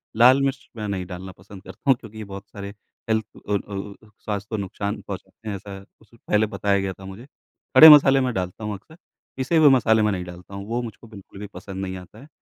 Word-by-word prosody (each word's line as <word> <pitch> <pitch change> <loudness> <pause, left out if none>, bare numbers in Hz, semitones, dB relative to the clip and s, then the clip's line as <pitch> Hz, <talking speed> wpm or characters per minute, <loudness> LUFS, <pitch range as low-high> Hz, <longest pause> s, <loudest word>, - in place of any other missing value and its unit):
लाल 125 +4 +6
मिर्च 135 -1 -2
मैं 105 -1 -4
नहीं 95 -2 -3
डालना 95 +1 -8
पसंद 95 +1 -13
करता 140 - -7
हूँ 135 - +7
क्योंकि 110 -4 -12
ये 110 - -5
बहुत 100 0 -9
सारे 100 -1 -8 0.4
हेल्थ 110 -1 +1 0.2
अ - - +1
अ - - +4
अ 100 0 -7
अ, - - -22
स्वास्थ्य 100 -1 -4
को 110 - -2
नुकसान 100 +1 -4
पहुँचाते 105 +2 -8
हैं, 100 - -3
ऐसा 100 0 -8 0.2
उ - - -19
सु 115 - -22
पहले 110 -1 +1
बताया 100 -1 +1
गया 95 -1 -2
था 95 - -13
मुझे। 95 +6 -10 0.5
खड़े 160 - +12
मसाले 135 -2 +8
मैं 130 -1 0
डालता 90 +2 -4
हूँ 105 0 -3
अक्सर, 105 +11 -12 0.4
पीसे 135 +5 +1
हुए 155 -2 +7
मसाले 110 -4 +4
मैं 105 0 +2
नहीं 90 -2 -3
डालता 90 +2 -12
हूँ। 100 0 -6
वो 120 +2 -1
मुझको 115 -1 -9
बिल्कुल 100 -2 -13
भी 105 - -6
पसंद 95 -1 -7
नहीं 95 -1 -4
आता 90 +4 -13
है। 140 - -14
105 Hz, 245 wpm, -23 LUFS, 95-115 Hz, 0.5 s, खड़े